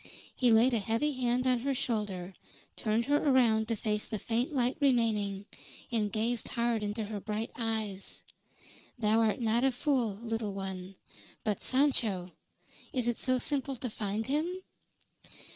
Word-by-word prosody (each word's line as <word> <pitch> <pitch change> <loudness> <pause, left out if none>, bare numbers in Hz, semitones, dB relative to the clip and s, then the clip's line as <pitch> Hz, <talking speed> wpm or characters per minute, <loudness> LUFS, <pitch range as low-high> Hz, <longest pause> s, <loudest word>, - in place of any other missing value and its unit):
He 250 - +3
laid 235 +3 +5
a 230 - +3
heavy 230 +9 +1
hand 250 -1 0
on 255 -1 +3
her 275 +3 -1
shoulder, 210 -8 -2 0.4
turned 225 +1 0
her 290 +2 +3
around 240 -7 +3
to 230 - 0
face 210 0 -1
the 215 - -3
faint 235 +6 -1
light 255 -3 +1
remaining, 220 -7 +2 0.5
and 215 -3 +1
gazed 230 +1 -1
hard 235 -2 0
into 210 +2 -2
her 210 0 -4
bright 215 +3 -3
eyes. 220 -4 -3 0.7
"Thou 220 -1 +3
art 225 +1 +2
not 230 +1 +2
a 270 - +4
fool, 250 -5 0
little 225 -2 -3
one. 190 -1 -5 0.5
But 210 -3 -1
Sancho 230 -10 +2 0.6
is 250 -5 -1
it 240 - 0
so 255 -1 +2
simple 275 +1 -1
to 250 -1 -5
find 210 +1 -2
him?" 330 +7 -1
230 Hz, 155 wpm, -31 LUFS, 210-255 Hz, 0.7 s, laid